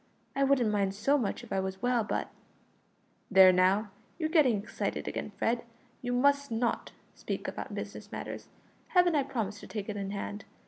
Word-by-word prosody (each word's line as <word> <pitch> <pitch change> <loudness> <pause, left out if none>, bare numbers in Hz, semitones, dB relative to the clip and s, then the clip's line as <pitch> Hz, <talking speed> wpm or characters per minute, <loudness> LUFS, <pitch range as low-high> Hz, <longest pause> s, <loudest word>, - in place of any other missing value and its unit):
I 275 - +2
wouldn't 265 -5 +3
mind 200 -2 +1
so 235 +8 +2
much 245 -4 -1
if 240 - -7
I 195 - +1
was 190 +2 -4
well, 245 -2 +2
but 210 - -2 0.5
" - - -39
"There, 190 -2 +8
now, 190 +3 +3 0.3
you're 315 -2 -1
getting 295 - +4
excited 200 +2 -3
again, - - -4
Fred; 235 +1 0 0.4
you 245 - -2
must 280 +3 +3
not 230 +1 -1 0.2
speak - - -4
about - - -5
business - - -7
matters. - - -6 0.5
Haven't 355 -1 +6
I 295 - +3
promised 215 -6 -3
to - - -11
take 210 -1 -5
it 210 - -3
in 195 -1 -3
hand? 205 +1 -5
225 Hz, 185 wpm, -30 LUFS, 200-270 Hz, 0.5 s, There